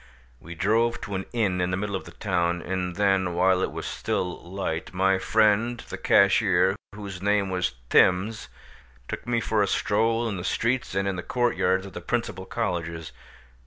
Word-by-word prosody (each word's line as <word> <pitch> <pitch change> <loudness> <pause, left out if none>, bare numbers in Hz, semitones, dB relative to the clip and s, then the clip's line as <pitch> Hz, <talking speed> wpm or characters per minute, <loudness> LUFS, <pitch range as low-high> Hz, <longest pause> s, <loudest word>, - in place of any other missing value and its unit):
We 85 +1 -10
drove 115 +5 +1
to 100 - -6
an 95 0 -3
inn 100 -6 0
in 90 - 0
the 90 - -1
middle 100 0 -3
of - - -5
the - - -11
town, 85 -3 0
and 90 -1 -3
then, 95 -3 +1
while 90 +1 +3
it - - -1
was - - -6
still 90 -1 -2
light, 85 -3 -4
my 95 0 +3
friend 110 +3 +2
the - - -8
cashier, 100 -1 +4 0.2
whose 100 -3 -7
name 100 -1 +1
was 90 -7 -1 0.2
Thims, 100 +5 +3 0.6
took - - -6
me 120 -1 +1
for 110 -1 0
a 100 - +2
stroll 115 +4 +1
in 100 -4 -3
the 90 - -5
streets 120 +2 -1
and 95 0 0
in 95 -2 -1
the - - -3
court 120 +3 0
yards 95 +1 +1
of 100 - -10
the 90 - -6
principal 115 -2 -3
colleges. 85 -7 -3
95 Hz, 190 wpm, -26 LUFS, 90-110 Hz, 0.6 s, cashier